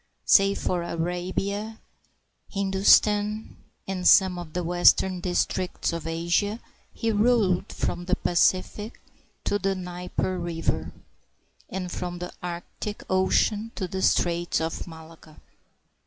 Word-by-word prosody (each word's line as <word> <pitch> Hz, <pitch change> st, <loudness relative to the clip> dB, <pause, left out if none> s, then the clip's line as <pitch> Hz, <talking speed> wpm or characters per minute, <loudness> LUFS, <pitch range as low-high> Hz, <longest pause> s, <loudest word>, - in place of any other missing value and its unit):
Save 195 Hz, 0 st, +5 dB
for 180 Hz, -1 st, -1 dB
Arabia, 185 Hz, +6 st, -3 dB, 0.7 s
Hindu 195 Hz, -1 st, -2 dB
stan, 210 Hz, +1 st, +4 dB, 0.3 s
and 185 Hz, -2 st, -1 dB
some 185 Hz, -2 st, +6 dB
of 165 Hz, -3 st, -9 dB
the 180 Hz, -, -2 dB
western 175 Hz, +2 st, +4 dB
districts 180 Hz, 0 st, -1 dB
of 165 Hz, -1 st, -4 dB
Asia, 170 Hz, +6 st, 0 dB, 0.3 s
he 230 Hz, -1 st, -1 dB
ruled 210 Hz, -4 st, +2 dB
from 175 Hz, -, -3 dB
the 185 Hz, +1 st, +1 dB
Pacific 185 Hz, +5 st, 0 dB, 0.4 s
to 205 Hz, -, 0 dB
the 195 Hz, -1 st, 0 dB
Dnieper 180 Hz, 0 st, -3 dB
River, 170 Hz, -1 st, -2 dB, 0.8 s
and 185 Hz, -2 st, -4 dB
from 175 Hz, -1 st, -4 dB
the 180 Hz, 0 st, -6 dB
Arctic 180 Hz, +4 st, -6 dB
Ocean 205 Hz, +4 st, +2 dB
to 185 Hz, -, -3 dB
the 190 Hz, +1 st, -4 dB
Straits 175 Hz, -1 st, +1 dB
of 160 Hz, +2 st, -3 dB
Malacca. 160 Hz, -1 st, -13 dB
185 Hz, 120 wpm, -26 LUFS, 175-200 Hz, 0.8 s, some